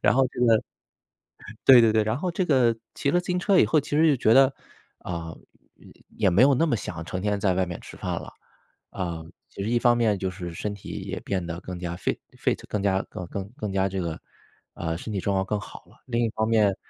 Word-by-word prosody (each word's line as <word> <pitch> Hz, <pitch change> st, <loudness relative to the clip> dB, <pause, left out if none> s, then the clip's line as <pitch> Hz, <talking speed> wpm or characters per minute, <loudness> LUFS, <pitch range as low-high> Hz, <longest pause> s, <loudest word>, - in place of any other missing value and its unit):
然 -, -, +4 dB
后 130 Hz, 0 st, +4 dB
这 -, -, -6 dB
个 115 Hz, -3 st, +4 dB, 1.0 s
对， 130 Hz, -3 st, +9 dB
对， 115 Hz, -2 st, +4 dB
对， 110 Hz, -1 st, +3 dB
然 110 Hz, +3 st, -1 dB
后 180 Hz, +2 st, -1 dB
这 180 Hz, +2 st, -1 dB
个 125 Hz, -7 st, +3 dB, 0.2 s
骑 140 Hz, -, 0 dB
了 175 Hz, -, +3 dB
自 -, -, -13 dB
行 180 Hz, 0 st, 0 dB
车 190 Hz, +1 st, +3 dB
以 -, -, +7 dB
后 155 Hz, -, +3 dB
其 145 Hz, -, -11 dB
实 160 Hz, +1 st, +5 dB
就 140 Hz, -, +4 dB
觉 115 Hz, -1 st, +4 dB
得， 135 Hz, 0 st, +6 dB, 0.5 s
啊， 85 Hz, -2 st, -6 dB, 0.4 s
也 -, -, -17 dB, 0.2 s
也 100 Hz, -4 st, +3 dB
没 100 Hz, +8 st, +4 dB
有 140 Hz, 0 st, +6 dB
那 165 Hz, +6 st, +2 dB
么 140 Hz, -, +1 dB
想 85 Hz, -4 st, -6 dB
成 95 Hz, +2 st, -4 dB
天 105 Hz, 0 st, 0 dB
在 95 Hz, -2 st, +1 dB
外 95 Hz, -, +2 dB
面 85 Hz, -1 st, -6 dB
吃 -, -, -12 dB
饭 -, -, -3 dB
了。 -, -, -10 dB, 0.6 s
啊， 85 Hz, -4 st, -4 dB, 0.2 s
其 -, -, -11 dB
实 110 Hz, -, -2 dB
一 120 Hz, -, +2 dB
方 120 Hz, 0 st, +4 dB
面 110 Hz, -4 st, +2 dB
就 95 Hz, 0 st, -2 dB
是 90 Hz, -2 st, -7 dB
身 105 Hz, +4 st, -3 dB
体 100 Hz, -, -12 dB
也 95 Hz, 0 st, -4 dB
变 95 Hz, -3 st, -2 dB
得 85 Hz, +1 st, -5 dB
更 90 Hz, -1 st, -7 dB
加 85 Hz, -1 st, -4 dB
fi 90 Hz, -, -1 dB, 0.2 s
fit， -, -, 0 dB
更 105 Hz, -, -2 dB
加 95 Hz, -1 st, +2 dB
更 90 Hz, -, -7 dB
更 95 Hz, +1 st, -5 dB
更 105 Hz, -8 st, -4 dB
加 95 Hz, 0 st, +1 dB
这 95 Hz, 0 st, -3 dB
个 85 Hz, -2 st, -4 dB, 0.5 s
呃， 80 Hz, -1 st, -3 dB
身 110 Hz, -, -6 dB
体 100 Hz, -, -2 dB
状 100 Hz, +1 st, -1 dB
况 95 Hz, 0 st, +1 dB
更 105 Hz, +1 st, -1 dB
好 -, -, -11 dB
了， -, -, -21 dB
另 120 Hz, -1 st, 0 dB
一 115 Hz, -, 0 dB
方 110 Hz, +1 st, -1 dB
面 105 Hz, -4 st, +3 dB
105 Hz, 280 characters per minute, -25 LUFS, 95-120 Hz, 1.0 s, 对